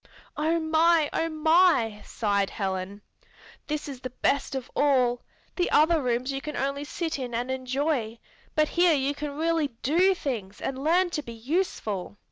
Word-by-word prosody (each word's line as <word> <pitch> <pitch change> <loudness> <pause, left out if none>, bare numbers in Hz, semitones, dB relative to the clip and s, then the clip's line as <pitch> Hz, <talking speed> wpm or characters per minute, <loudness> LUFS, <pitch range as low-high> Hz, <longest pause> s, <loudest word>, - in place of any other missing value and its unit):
"Oh 320 +2 +1
my! 320 -1 +3
Oh 330 - 0
my!" 315 - +3
sighed 200 -3 0
Helen. 195 0 -4 0.6
"This 300 0 -3
is 275 -3 -7
the 255 - -5
best 275 +2 0
of 260 -2 -5
all! 255 -4 +2 0.4
The 355 - +1
other 320 +1 +4
rooms 250 +1 -1
you 270 0 -3
can 300 +1 -6
only 275 +1 -2
sit 325 0 -3
in 245 -3 -4
and 245 +2 -2
enjoy, 260 -2 -1 0.4
but 305 -1 +3
here 345 -2 +4
you 275 0 0
can 290 0 -6
really 325 -1 +1 0.2
do 360 +8 +3
things 220 - -4
and 265 0 -4
learn 350 +3 +3
to 305 - -2
be 235 -5 -9
useful." 225 - -2
280 Hz, 165 wpm, -26 LUFS, 245-320 Hz, 0.6 s, other